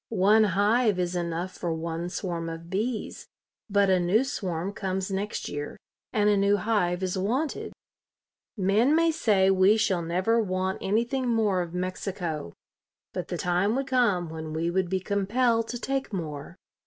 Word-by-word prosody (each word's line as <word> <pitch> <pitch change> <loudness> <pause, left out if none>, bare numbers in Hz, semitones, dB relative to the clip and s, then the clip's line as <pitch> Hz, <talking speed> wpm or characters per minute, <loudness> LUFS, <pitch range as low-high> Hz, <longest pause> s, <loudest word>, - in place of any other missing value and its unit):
One 215 +1 +4
hive 205 +3 +2
is 180 0 -1
enough 170 +1 -2
for 175 -2 -4
one 165 +1 -4
swarm 170 -3 -3
of 165 +1 -8
bees, 220 +4 -3 0.4
but 200 0 +3
a 185 - +4
new 185 +8 +3
swarm 190 -7 -3
comes 190 -1 -3
next 200 +2 -3
year 145 0 -5 0.3
and 210 -1 +2
a 210 - +4
new 200 +1 +3
hive 190 -5 0
is 185 0 -1
wanted." 255 +11 -1 0.9
Men 210 +9 +3
may 330 0 +4
say 200 -10 +3
we 190 +3 +5
shall 195 -5 +1
never 185 +8 +1
want 185 -2 -1
anything 235 +6 0
more 215 -5 +2
of 175 0 -6
Mexico, 180 - -3 0.6
but - - -4
the - - -3
time 180 +5 +1
would 270 +1 -1
come 235 -10 +2
when 160 -1 -6
we 165 +2 -1
would 185 0 0
be 190 0 0
compelled 225 +4 +1
to 245 - -5
take 270 0 -2
more. 155 -4 -5
190 Hz, 165 wpm, -27 LUFS, 175-220 Hz, 0.9 s, we